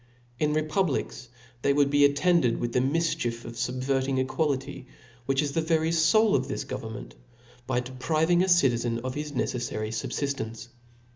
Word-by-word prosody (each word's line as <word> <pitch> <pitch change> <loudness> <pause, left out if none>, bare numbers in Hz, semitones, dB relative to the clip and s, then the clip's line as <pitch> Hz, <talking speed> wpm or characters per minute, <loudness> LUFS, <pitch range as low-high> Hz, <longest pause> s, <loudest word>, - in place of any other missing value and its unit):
In 150 -1 +1
republics 155 -5 -1 0.3
they 140 +2 +2
wdyld 140 -1 +3
be 145 0 +5
attended 145 -2 +3
with 120 -1 -3
the - - +3
mifchief 130 -4 -1
of 115 - -7
fubverting 130 +2 -1
equality, 130 -1 -2 0.4
which 135 +1 +2
is 145 - -2
the 165 - 0
very 160 0 +1
foul 185 +7 +4
of 130 -1 +1
this - - -3
government, 110 - -7 0.5
by 125 -1 0
depriving 155 +7 +1
a 190 - +1
citizen 120 -8 +3
of 130 0 -3
his 150 +1 -5
neceffary 120 -4 -2
fubfiftence. 115 0 -4
135 Hz, 150 wpm, -27 LUFS, 125-155 Hz, 0.5 s, be